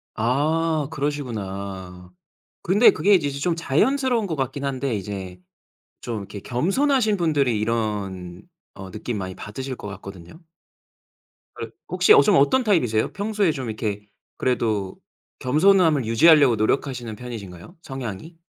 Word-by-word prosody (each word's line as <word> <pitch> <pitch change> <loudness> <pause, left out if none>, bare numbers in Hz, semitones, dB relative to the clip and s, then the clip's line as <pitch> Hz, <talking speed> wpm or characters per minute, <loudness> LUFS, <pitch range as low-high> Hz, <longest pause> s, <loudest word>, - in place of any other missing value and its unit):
아. 150 +6 0
그러시구나. 100 - -5 0.5
근데 205 +7 +5
그게 205 - +2
이제 150 -6 +1
좀 140 +5 -1
자연스러운 235 - +1
것 160 - -3
같긴 135 +1 -3
한데 135 -2 -2
이제 95 -2 -6 0.6
좀 115 -3 -4
이렇게 100 +1 -8
겸손하신 215 - +1
분들이 145 -9 +1
이런 100 -5 -3 0.3
어 95 -1 -10
느낌 110 +2 -5
많이 95 -1 -5
받으실 130 +5 -6
것 105 - -9
같거든요. 95 - -10 1.2
그럼 - - -7 0.2
혹시 430 - +4
어 440 - +8
좀 205 -3 +3
어떤 250 - +3
타입이세요? 125 - +1
평소에 205 -3 0
좀 130 -5 -5
이렇게 105 -2 -4 0.3
그래도 110 -6 -1 0.4
겸손함을 155 - +3
유지하려고 140 +2 +5
노력하시는 120 +1 -1
편이신가요? 110 - -9
성향이? 135 - -7
125 Hz, 310 characters per minute, -23 LUFS, 105-160 Hz, 1.2 s, 어